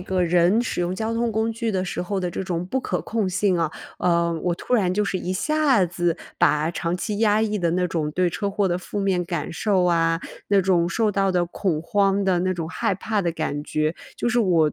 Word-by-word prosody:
个 185 0 -1
人 175 +6 +3
使 230 - -3
用 175 +1 -1
交 220 +3 -2
通 230 0 0
工 220 +1 0
具 230 0 -2
的 190 -2 -1
时 180 - -4
候 190 +2 -2
的 180 -1 -2
这 190 - -4
种 175 -2 -2
不 255 +9 -2
可 - - -2
控 215 -4 -1
性 190 -1 +1
啊， 165 -2 0 0.3
呃， 170 -1 +2
我 175 -1 +1
突 250 - -7
然 190 -7 +3
就 210 +1 +1
是 190 -1 -1
一 180 - -3
下 275 0 +2
子 175 -1 -1 0.2
把 150 +2 +3
长 170 +1 -2
期 210 +2 -3
压 215 -1 +3
抑 210 -1 0
的 170 -3 +1
那 180 0 +1
种 155 -3 -1
对 180 0 +1
车 200 +4 -2
祸 200 0 +1
的 175 +1 0
负 205 - -6
面 190 -3 +1
感 165 -4 -4
受 185 +1 +1
啊， 165 -1 +2 0.3
那 200 -1 +4
种 175 -2 +2
受 215 +2 +1
到 195 -1 +2
的 180 -1 +2
恐 170 -2 -2
慌 200 +2 +2
的 185 -2 +2
那 185 +1 +1
种 165 -2 -4
害 190 - -1
怕 215 +2 -1
的 175 -3 0
感 150 -3 -3
觉， 155 +2 -1 0.2
就 240 - -1
是 240 - +1
我 170 -9 +3
185 Hz, 255 characters per minute, -23 LUFS, 170-205 Hz, 0.3 s, 那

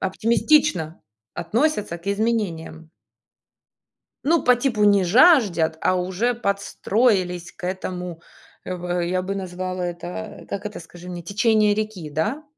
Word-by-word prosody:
оптимистично 225 - +1 0.3
относятся 210 - -1
к 170 - -22
изменениям. 195 -7 -2 1.3
Ну, 325 +2 +3
по 250 - +6
типу, 240 -4 0
не 200 -2 +5
жаждут, 195 - +4
а 185 - +2
уже 190 +7 0
подстроились 200 -3 0
к 190 - -12
этому, 180 -2 -5 0.4
э, - - -4
в 180 0 -3
я 185 +2 0
бы 190 +2 -4
назвала 185 -1 -4
это, 175 +5 -6
как 200 +1 -5
это, 210 0 -6
скажи 175 +1 -12
мне, 175 -1 -6
течение 210 +2 +2
реки, 210 -7 -4
да? 185 - -2
190 Hz, 130 wpm, -22 LUFS, 175-220 Hz, 1.3 s, по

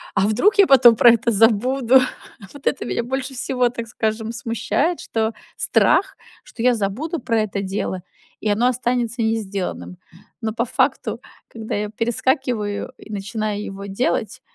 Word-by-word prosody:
А 200 - +3
вдруг 385 - +2
я 400 -2 +6
потом 255 -4 +7
про 240 - +8
это 235 +1 +1
забуду?" 235 +4 +4 0.5
Вот 285 -1 -8
это 275 - 0
меня 235 - -2
больше 265 +2 -4
всего, 250 -1 0
так 235 -1 -6
скажем, 220 -1 -2
смущает, 240 +9 -1
что 220 0 -1 0.2
страх, - - +2 0.3
что - - -10
я 250 0 +4
забуду 230 - -3
про 230 -3 0
это 200 -2 -3
дело, 190 -1 -3 0.4
и 215 - -1
оно 220 +4 +2
останется 245 -1 -1
не 220 0 +1
сделанным. 180 - -5 0.4
Но 220 -1 -2
по 235 +2 -1
факту, - - 0 0.3
когда 220 -1 -7
я 210 0 -2
перескакиваю 230 -1 -1
и 215 - -13
начинаю 210 0 -3
его 195 0 -7
делать, 220 +3 -2
230 Hz, 155 wpm, -21 LUFS, 210-250 Hz, 0.5 s, про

